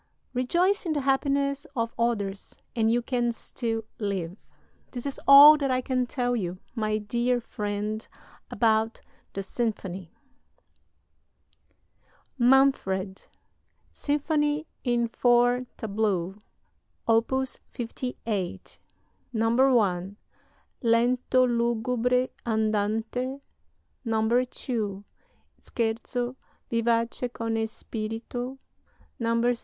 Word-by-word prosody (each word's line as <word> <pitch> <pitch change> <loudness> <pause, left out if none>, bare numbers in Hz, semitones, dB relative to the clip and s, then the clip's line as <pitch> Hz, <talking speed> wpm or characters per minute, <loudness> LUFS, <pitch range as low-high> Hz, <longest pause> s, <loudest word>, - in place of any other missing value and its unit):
Rejoice 345 +10 +1
in 320 - +1
the 290 - 0
happiness 275 +1 +1
of 230 -2 -1
others 205 -4 -2 0.2
and 225 -1 +3
you 240 +1 +1
can 240 -1 0
still 225 -1 -3 0.2
live. 190 -5 -2 0.6
"This 245 0 -5
is 280 - -4
all 290 +2 +11
that 280 -2 -1
I 255 0 +1
can 255 -1 0
tell 245 -1 -1
you, 185 -5 -3 0.2
my 215 -2 0
dear 240 +4 0
friend, 210 -1 -4 0.4
about 225 -1 +1 0.3
the 195 - -3
symphony...." 195 -5 -3 2.3
"MANFRED," 240 -7 +2 0.6
SYMPHONY 295 +1 0 0.2
IN 240 -2 +1
FOUR 245 +1 +3
TABLEAUX: 200 -3 -1 0.7
Op. 225 +1 +3 0.4
58 225 -5 -4 0.5
1. 225 -5 +2 0.6
Lento 245 +2 +3
lugubre; 240 +1 +1
andante 220 +4 -1 0.6
2. 225 -2 0 0.6
Scherzo: 240 +2 -2 0.4
Vivace 230 +1 0
con 230 -1 -3
spirito 230 +4 -5 0.6
3. 230 +1 +2
235 Hz, 85 wpm, -27 LUFS, 220-250 Hz, 2.3 s, all